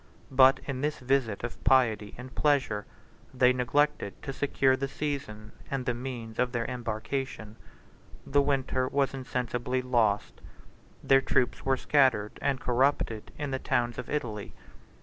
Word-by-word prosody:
62 - - -12
But 130 0 +7
in 130 -2 -3
this 150 +1 -1
visit 125 -5 0
of 120 - -6
piety 115 -5 +3
and 125 +1 -9
pleasure, 135 -9 +1 0.5
they 125 0 +5
neglected 125 -2 0
to 135 - -4
secure 135 -1 +2
the 135 +1 -2
season, 135 -8 -5 0.2
and 135 -2 -2
the 125 - +1
means 120 -3 -6
of 125 0 +2
their 115 -1 -1
embarkation: 115 -1 -4 0.7
the 145 +1 +3
winter 130 -2 0
was 140 0 0
insensibly 125 -1 -2
lost: 115 -5 +1 0.6
their 135 0 +5
troops 125 - 0
were 135 0 +2
scattered 130 -8 +2
and 135 -2 0
corrupted 125 -4 0
in 145 -2 -3
the 130 - -1
towns 120 -1 0
of 125 - -6
Italy. 115 -9 -4
130 Hz, 150 wpm, -29 LUFS, 120-135 Hz, 0.7 s, But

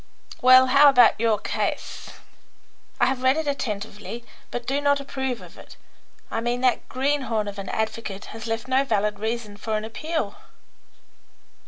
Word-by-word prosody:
"Well, 255 0 +8
how 280 +3 +7
about 245 -5 +5
your 225 -2 +2
case? - - -3 0.9
I - - +5
have 260 -1 -1
read 260 +3 +3
it 320 - -1
attentively, 230 -3 -4 0.2
but 245 -1 -5
do 275 +3 0
not 285 0 +3
approve 265 -3 -4
of - - -14
it. - - -14 0.5
I 225 - -1
mean 240 +1 -1
that 255 -1 +1
greenhorn 260 -5 0
of 200 0 -6
an 195 - -6
advocate 220 -2 -3
has 225 +1 -7
left 225 +1 -3
no 260 +1 +3
valid 210 -5 0
reason 220 -1 -3
for 215 +1 -2
an 215 - -4
appeal." 275 -1 -3
240 Hz, 160 wpm, -24 LUFS, 215-265 Hz, 0.9 s, Well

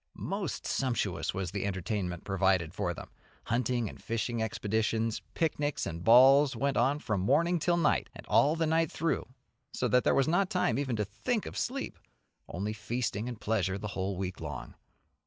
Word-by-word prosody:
Most 195 -3 -4
sumptuous 130 -3 -1
was 95 -2 -3
the 100 - -3
entertainment 95 -2 -2
provided 95 -4 +1
for 100 -3 -1
them. 85 - -9 0.3
Hunting 120 0 0
and - - -10
fishing 115 +1 -2
expeditions, 110 +1 -1
picnics 150 -3 0
and 85 +1 -5
balls 135 +5 +7
went 140 0 0
on 135 +4 +3
from 105 -9 -2
morning 170 - +3
till 175 +2 +2
night, 165 -3 +2
and - - -10
all 150 +3 +4
the 165 0 +1
night 160 0 +2
through, 165 +1 -1 0.5
so - - 0
that 125 0 +4
there - - +3
was 135 - +3
not 180 +4 +2
time 180 -6 +1
even 130 -4 -1
to 105 -1 -1
think 210 - -2
of - - -7
sleep, 270 +2 -3 0.5
only 100 +5 -3
feasting 110 +1 -2
and 120 -3 -7
pleasure 95 -3 0
the 105 +1 -5
whole 95 -1 -3
week 95 -1 -4
long. - - -6
115 Hz, 175 wpm, -30 LUFS, 100-145 Hz, 0.5 s, balls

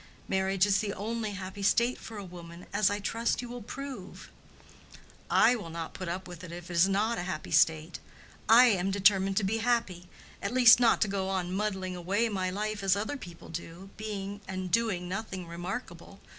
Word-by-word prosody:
Marriage 190 0 +2
is 195 -2 +3
the 205 -2 -2
only 220 +1 -3
happy 195 0 -7
state 235 +5 +2
for 225 - -9
a 200 - -6
woman, 170 -1 -11
as 210 - +3
I 205 - -1
trust 230 +3 -1
you 245 - -5
will 245 0 -7
prove." 255 -3 -8 1.0
"I 250 - +5
will 205 -8 -6
not 165 0 -6
put 185 - -6
up 185 +2 -4
with 175 -1 -10
it 175 - -8
if 175 +1 -8
it - - -5
is 170 +3 +4
not 215 +4 +1
a 175 +1 -4
happy - - -5
state. 160 0 +2 0.5
I 235 +3 +9
am 195 -5 +2
determined 195 -1 +3
to 215 - +2
be 200 +4 0
happy—at 220 -9 -3
least 245 -2 +8
not 235 -2 +4
to 215 - +4
go 195 -1 -2
on 185 -2 -2
muddling 190 -2 -2
away 200 +6 0
my 190 -3 -1
life 210 +2 -3
as 195 -1 +3
other 215 +8 -2
people 175 -11 -10
do, 170 +3 -8
being 205 -2 -5
and 185 -1 -4
doing 215 -6 +1
nothing 190 -1 -5
remarkable. 175 +2 -7
195 Hz, 195 wpm, -29 LUFS, 180-215 Hz, 1.0 s, I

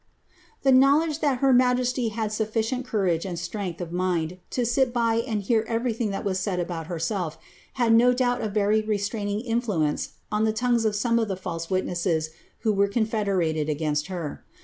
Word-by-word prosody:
' 450 - -32
>w 265 -1 +6 0.2
ledge 320 -2 -2
that 280 -5 0
her 270 -1 +5
majesty 250 0 +2
had 220 -1 -3
sufiicient 225 +4 -1
courage 185 -8 0
and 180 -3 -4
strength 175 0 -4 0.7
sit 245 +1 +1
by 230 -2 +2
and 215 -3 -2
hear 220 +2 +2
everything 230 -1 -1
that 195 - -4
was 190 -2 0
said 185 -2 -1
about 170 -2 -4
herself, 170 -1 -2 0.4
had 235 -3 +3 0.6
very 210 +1 +2
restraining 205 0 -2
influence 225 -11 -1 0.2
on 210 0 +1
the 220 - +3
tongues 240 0 +1
of 215 -1 +1
some 230 +2 +2
of 225 - 0
the 190 -2 -3
false 165 -2 -5
vho 170 -3 -1 0.3
were 200 -3 +3
confederated 200 -8 0
against 150 0 -1
her. 175 -6 -5
215 Hz, 155 wpm, -25 LUFS, 180-235 Hz, 0.7 s, >w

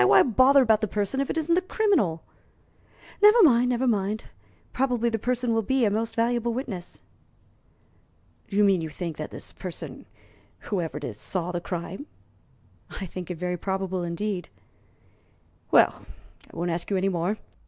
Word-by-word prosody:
Why - - +6
bother 260 +3 +5
about 220 -3 +3
the 215 - 0
person 210 +7 -1
if 275 - -2
it - - -2
isn't 320 +1 +1
the 360 - +3
criminal?" 370 - +1 1.0
"Never 420 +2 +8
mind 250 -5 +5
never 250 +1 0
mind; 210 -2 0 0.5
probably 245 -3 +1
the 225 -1 -2
person 245 +1 0
will 225 - +2
be 260 +3 +1
a 205 - +2
most 225 +2 -2
valuable 235 0 0
witness." 210 -9 -6 1.5
"Do 200 - -4
you 210 - +5
mean 195 -4 +4
you 160 - -4
think 165 +1 -5
this 155 - -7
person 165 -7 -8 0.5
whoever 175 -7 -3
it 150 - -8
is 110 -6 -6
saw 180 -2 -3
the 175 -1 -3
crime?" 180 - -5 0.9
"I 195 - -4
think 180 0 -7
it 180 - -4
very 180 +1 -2
probable 190 0 -2
indeed." 175 +2 -3 1.2
"Well, - - +3 0.4
I - - -13
won't 175 +1 -1
ask 170 +1 -3
you 200 - +1
any 190 +1 +1
more. 180 +3 -1
205 Hz, 165 wpm, -26 LUFS, 175-245 Hz, 1.5 s, Never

